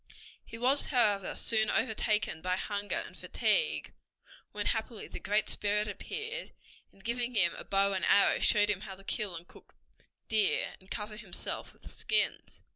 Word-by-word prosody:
He 230 - -10
was, 260 +4 +3
however, 210 -7 +2
soon 220 -2 +2
overtaken 215 -7 +1
by 185 +1 +1
hunger 205 +1 -2
and - - -12
fatigue, 480 -1 +1 0.6
when 205 0 -4
happily 225 -1 -2
the - - -8
Great 210 +1 +1
Spirit 210 +1 +1
appeared, 450 - -5 0.4
and 195 - -22
giving 240 +2 -2
him 175 -5 +3
a - - -7
bow 200 0 +2
and 190 - -2
arrow 200 - +5
showed 210 0 +4
him 190 -2 -3
how 200 -2 -7
to 195 - -16
kill 200 -3 -2
and 170 +1 -9
cook - - -17 0.5
deer, 215 -2 +2
and 190 - -21
cover 210 -1 -5
himself - - -4
with - - -26
the - - -10
skins. - - -2
210 Hz, 170 wpm, -31 LUFS, 195-230 Hz, 0.6 s, arrow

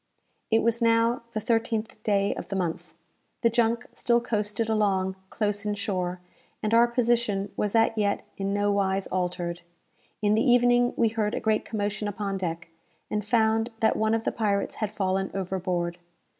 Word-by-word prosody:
It 225 0 +3
was 235 +1 +1
now 230 +1 +3
the 215 - -1
thirteenth 225 -1 -1
day 200 -2 +1
of - - -7
the 195 - -4
month. 175 -4 -3 0.5
The 230 - +3
junk 235 +1 +1
still 235 -1 +2
coasted 215 -1 -1
along 195 -4 +1
close 205 -2 -1
in 210 -1 -1
shore, 185 -3 -2 0.4
and 215 +1 0
our 235 +1 +6
position 235 -5 +1
was 210 +1 -1
as 225 0 +5
yet 205 -2 0
in 195 0 -2
nowise 200 -1 +1
altered. 180 -1 -2 0.6
In 210 0 +2
the 220 - +3
evening 245 -1 +4
we 230 -2 +3
heard 215 -1 -1
a - - -1
great 220 -1 +1
commotion 210 -1 -2
upon 200 -1 -3
deck, 170 -2 -4 0.4
and 210 0 -1
found 225 +1 +2
that 220 - +3
one 220 +1 +2
of 225 - -2
the - - 0
pirates 205 -3 0
had 215 - 0
fallen 190 -2 -1
overboard. 180 -2 -2
210 Hz, 170 wpm, -27 LUFS, 195-225 Hz, 0.6 s, our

